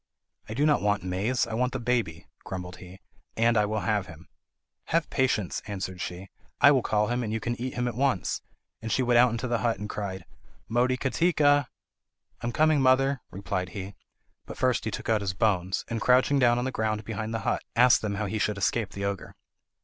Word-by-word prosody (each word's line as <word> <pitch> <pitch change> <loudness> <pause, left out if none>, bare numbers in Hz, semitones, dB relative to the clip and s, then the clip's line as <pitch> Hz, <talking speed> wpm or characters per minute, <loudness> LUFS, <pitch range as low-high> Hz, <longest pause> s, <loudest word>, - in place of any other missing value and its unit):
"I 110 - -5
do 145 +4 +2
not 150 -1 +3
want 105 -2 +1
maize, 100 +7 0
I - - -7
want 125 +2 0
the 130 - -2
baby," 115 -9 -1 0.2
grumbled 90 -1 -6
he 90 +1 -13 0.4
"and 115 +1 +3
I 105 -1 +3
will 110 0 -2
have 105 -3 0
him." 85 +1 -13 0.6
"Have 165 -1 0
patience," 120 -8 0
answered 95 -3 -5
she; 90 +2 -6 0.3
"I 140 - +8
will 135 -3 +3
call 105 -1 +1
him, 120 +1 0
and 110 -3 -3
you 110 - -1
can 120 +2 -2
eat 130 +1 -4
him 125 0 -1
at 120 - -2
once." 130 -5 0 0.4
And 110 0 -4
she 130 - +2
went 120 -1 +4
into 115 +2 -3
the 120 -1 0
hut 115 -2 0
and 105 +2 -5
cried, 95 -4 -5 0.4
"Motikatika!" 145 +4 +2 0.7
"I - - -3
am - - -1
coming, 155 +1 +3
mother," 135 +1 +3
replied 95 -1 -3
he; 95 +1 -6 0.5
but - - -8
first 130 -3 +1
he - - 0
took 110 - -6
out 110 -2 +2
his 95 -2 -2
bones, 95 -3 0
and, 115 -1 -3
crouching 130 +4 +4
down 120 -2 +4
on 125 - -1
the 130 - -1
ground 110 -2 -2
behind 110 0 -4
the 115 -1 -2
hut, - - 0
asked 125 +1 +6
them 105 -2 -2
how 105 +2 -2
he 110 +2 -3
should 105 -1 0
escape 100 +1 0
the 100 0 -4
ogre. 100 -2 -4
110 Hz, 210 wpm, -27 LUFS, 100-125 Hz, 0.7 s, I